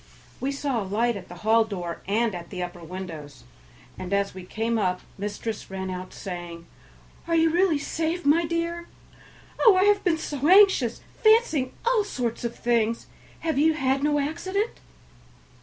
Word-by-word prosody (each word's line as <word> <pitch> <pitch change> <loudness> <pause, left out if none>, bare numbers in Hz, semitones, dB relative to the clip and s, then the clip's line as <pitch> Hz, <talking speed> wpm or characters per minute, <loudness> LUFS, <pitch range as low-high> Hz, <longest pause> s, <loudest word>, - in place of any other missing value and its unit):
We 270 - -1
saw 275 -4 -1
a - - -2
light 220 +5 0
at 185 -2 -8
the 175 - -10
hall 225 +1 +5
door 180 -6 -5
and 220 +2 +1
at 175 -1 -7
the 180 -2 -4
upper 175 -1 -7
windows, 160 -7 -8 0.6
and 185 0 -6
as 200 0 +1
we 190 - -8
came 225 +4 -1
up 180 -3 0
mistress 205 +2 -5
ran 190 -1 -4
out, 185 0 -6
saying, 175 -2 -7 0.6
"Are 335 - +1
you 325 0 +4
really 350 -2 +3
safe, 325 +3 -2
my 310 +4 +4
dear? 335 +1 -2 0.7
Oh! 440 -5 +7
I 370 - +4
have 410 0 +3
been 345 -4 +2
so 290 -2 -2
anxious, 375 - +5 0.2
fancying 435 - +4
all 470 -3 +3
sorts 245 - -3
of 235 0 -3
things. 230 -1 0 0.4
Have 320 -4 0
you 315 +1 +4
had 270 -2 +1
no 295 0 +2
accident?" 375 +9 -2
240 Hz, 170 wpm, -25 LUFS, -, 0.7 s, Oh